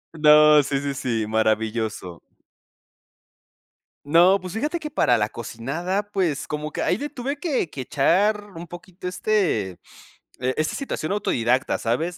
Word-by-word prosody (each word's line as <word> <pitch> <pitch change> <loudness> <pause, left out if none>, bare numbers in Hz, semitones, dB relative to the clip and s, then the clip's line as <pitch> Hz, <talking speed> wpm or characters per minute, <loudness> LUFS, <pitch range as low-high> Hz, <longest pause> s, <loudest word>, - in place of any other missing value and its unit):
No, 150 -1 +7
sí, 140 0 -1
sí, 140 0 -3
sí, 115 -4 -2
maravilloso. 110 -4 -1 1.8
No, 175 +6 +5
pues, 185 -1 -7
fíjate 300 +9 -2
que 300 -1 -6
para 120 - +3
la 105 -1 0
cocinada, 150 - -3
pues, 175 -8 -1
como 150 0 -4
que - - -3
ahí - - +1
le 290 +2 -4
tuve 275 +1 -4
que 280 - -1
que 140 - -10
echar 195 - +2
un 170 +1 -9
poquito 175 +2 -9
este, 180 - 0 0.7
eh, 130 +1 0
esta 155 0 -1
situación 200 - -3
autodidacta, 130 - 0
¿sabes?, 160 +10 -2
150 Hz, 145 wpm, -23 LUFS, 120-195 Hz, 1.8 s, No